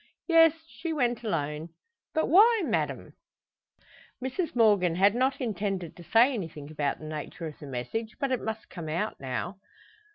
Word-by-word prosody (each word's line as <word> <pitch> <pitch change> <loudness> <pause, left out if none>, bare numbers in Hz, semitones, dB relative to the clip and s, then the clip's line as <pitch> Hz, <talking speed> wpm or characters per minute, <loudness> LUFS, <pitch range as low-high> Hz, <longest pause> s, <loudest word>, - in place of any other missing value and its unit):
"Yes; 325 -1 +5
she 330 0 -5
went 245 -7 0
alone." 160 -4 -3 0.4
"But 315 - +2
why, 425 +5 +6
madame?" - - -2 1.1
Mrs 265 +6 -3
Morgan 205 -7 +4
had 195 +3 +5
not 260 +3 +1
intended 195 -7 -3
to 175 - -12
say 235 - +4
anything 160 - -6
about 145 -2 -1
the 155 - -10
nature 155 +2 -6
of 155 -2 -7
the 145 - -9
message, 215 - -4
but 275 -1 -1
it 255 - 0
must 220 0 -4
come 165 -4 -7
out 175 +8 -2
now. 135 +9 -4
210 Hz, 160 wpm, -28 LUFS, 160-260 Hz, 1.1 s, why